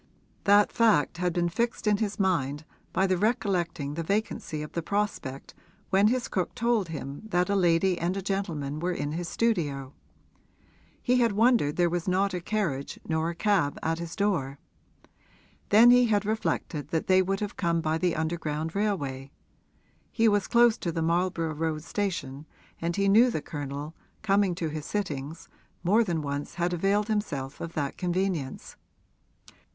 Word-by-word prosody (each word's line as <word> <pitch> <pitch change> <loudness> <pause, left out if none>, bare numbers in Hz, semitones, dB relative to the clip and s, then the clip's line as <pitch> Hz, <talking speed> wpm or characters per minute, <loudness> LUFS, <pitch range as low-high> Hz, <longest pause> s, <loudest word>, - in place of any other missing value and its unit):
That 205 +1 +5
fact 215 - +3
had 180 0 0
been 175 0 0
fixed 230 +9 -2
in 210 -1 +3
his 210 -1 -2
mind 150 -6 0 0.3
by 190 - +2
his 185 -1 +1
recollecting 180 -9 0
the 165 - -3
vacancy 165 -4 -2
of 150 - -8
the 170 - -2
prospect 185 -8 -3 0.4
when 195 +2 +5
his 245 +2 0
cook 185 -2 -2
told 235 -5 +1
him 145 -3 -6
that 180 -2 +1
a - - +2
lady 175 0 +3
and 175 +3 -1
a - - -2
gentleman 160 -7 -2
were 180 +2 -1
in 145 -3 -3
his 170 +2 -4
studio: 145 - -1 1.1
he 250 0 +3
had 235 -3 +3
wondered 220 - +3
there 175 0 +3
was 175 +1 -2
not 190 +1 +1
a 180 - -3
carriage 170 -9 -2
nor 160 +1 0
a 170 - -5
cab 190 -8 +1
at 165 +1 0
his 170 -1 -6
door. 170 -10 0 1.1
Then 230 +4 +8
he 245 0 +6
had 210 -2 +1
reflected 200 -8 -2
that 160 +1 -1
they 185 0 +5
would 195 +1 -1
have 210 -1 -4
come 170 -2 0
by 160 0 0
the 175 0 +1
underground 160 -1 -2
railway; 145 -11 -2 0.8
he 230 -1 +3
was 205 -2 +2
close 235 -2 +4
to 170 - -2
the 165 0 -2
Marlborough 170 -1 0
Road 155 0 -2
station 160 -8 -3 0.3
and 170 +1 -1
he 200 0 +1
knew 225 +6 +6
the 225 - -2
Colonel, 145 +1 -6 0.3
coming 195 -3 +2
to 165 -2 -2
his 155 0 -5
sittings, 160 -6 -4 0.4
more 210 +6 +4
than 170 -7 -2
once 145 0 -4
had 175 0 0
availed 200 +4 +1
himself 145 -11 -3
of 165 0 -5
that 145 -3 -3
convenience. 180 -6 -2
175 Hz, 170 wpm, -27 LUFS, 155-205 Hz, 1.1 s, Then